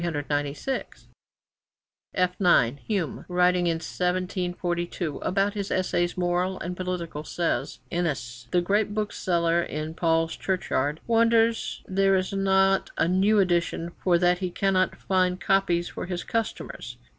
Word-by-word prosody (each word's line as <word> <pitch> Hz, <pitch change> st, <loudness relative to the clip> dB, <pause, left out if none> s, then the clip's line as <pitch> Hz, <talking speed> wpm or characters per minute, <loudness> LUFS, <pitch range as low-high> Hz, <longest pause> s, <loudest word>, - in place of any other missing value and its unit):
[F 180 Hz, -1 st, +2 dB
9] 140 Hz, -, +4 dB
Hume, 195 Hz, -8 st, -2 dB
writing 180 Hz, 0 st, +2 dB
in 165 Hz, -, +2 dB
1742 175 Hz, -1 st, -2 dB
about 195 Hz, +2 st, 0 dB
his 200 Hz, -2 st, -3 dB
Essays 175 Hz, -1 st, 0 dB
Moral 180 Hz, +1 st, 0 dB
and 180 Hz, +1 st, -4 dB
Political, 180 Hz, -4 st, -4 dB
says: 170 Hz, +2 st, -2 dB
'Innys, 135 Hz, -9 st, -3 dB
the 180 Hz, -, +2 dB
great 205 Hz, +3 st, +1 dB
bookseller 170 Hz, -5 st, +1 dB
in 155 Hz, -1 st, -4 dB
Paul's 165 Hz, 0 st, +1 dB
Church 190 Hz, -2 st, -3 dB
yard, 145 Hz, +4 st, 0 dB
wonders 230 Hz, 0 st, +2 dB
there 195 Hz, 0 st, +3 dB
is 185 Hz, +1 st, -1 dB
not 195 Hz, 0 st, +3 dB
a -, -, +2 dB
new 195 Hz, +4 st, +3 dB
edition, 175 Hz, -2 st, +1 dB
for 175 Hz, -2 st, +4 dB
that 175 Hz, 0 st, +2 dB
he 185 Hz, -1 st, -2 dB
cannot 185 Hz, +1 st, +1 dB
find 185 Hz, -1 st, 0 dB
copies 175 Hz, -3 st, +1 dB
for -, -, -6 dB
his 180 Hz, -1 st, -3 dB
customers.' 195 Hz, -, -4 dB
180 Hz, 130 wpm, -26 LUFS, 170-195 Hz, -, 9